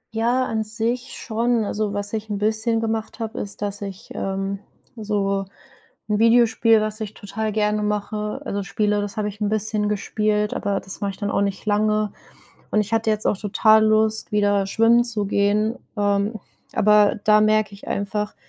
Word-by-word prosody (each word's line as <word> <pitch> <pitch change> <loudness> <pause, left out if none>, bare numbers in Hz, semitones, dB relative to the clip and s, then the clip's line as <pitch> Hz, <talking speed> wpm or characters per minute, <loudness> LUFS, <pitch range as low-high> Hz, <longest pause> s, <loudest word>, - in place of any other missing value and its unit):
Ja, 240 +3 +2
an 220 -3 -1
sich 230 +4 -2
schon. 230 -1 0
Also, 210 0 -2
was 205 +1 -3
ich 220 0 -4
'n 205 - -2
bisschen 220 +2 +1
gemacht 225 -1 -3
habe, 225 -1 -4
ist, 205 0 -5
dass 205 0 -3
ich, 195 -2 -8
ähm, 195 0 -3 0.4
so 200 -3 -1 0.6
'n 210 - +1
Videospiel, 230 -1 +4
was 215 +1 -3
ich 215 -1 -5
total 215 +1 -4
gerne 210 0 +1
mache, 210 0 -2
also, 200 - -2
spiele. 210 0 0
Das 205 +2 -5
habe 210 -1 0
ich 205 +1 -12
'n 205 - +1
bisschen 215 0 0
gespielt, 210 0 0
aber 200 -1 -1
das 190 - -8
mache 200 - 0
ich - - -13
dann 205 -1 -2
auch - - +1
nicht 200 +1 -2
lange. 215 0 +1 0.6
Und 215 - +2
ich 210 +2 -1
hatte 225 0 +1
jetzt 215 0 +1
auch - - +2
total 215 +2 +4
Lust, 215 0 +2
wieder 205 -1 +2
schwimmen 230 +4 +4
zu 220 -4 -1
gehen, 205 +3 +1 0.2
ähm, 205 +1 0 0.3
aber 210 +1 +4
da 215 -1 +5
merke 215 -1 +2
ich 200 - -13
einfach, 210 +1 -2
210 Hz, 180 wpm, -22 LUFS, 205-220 Hz, 0.6 s, da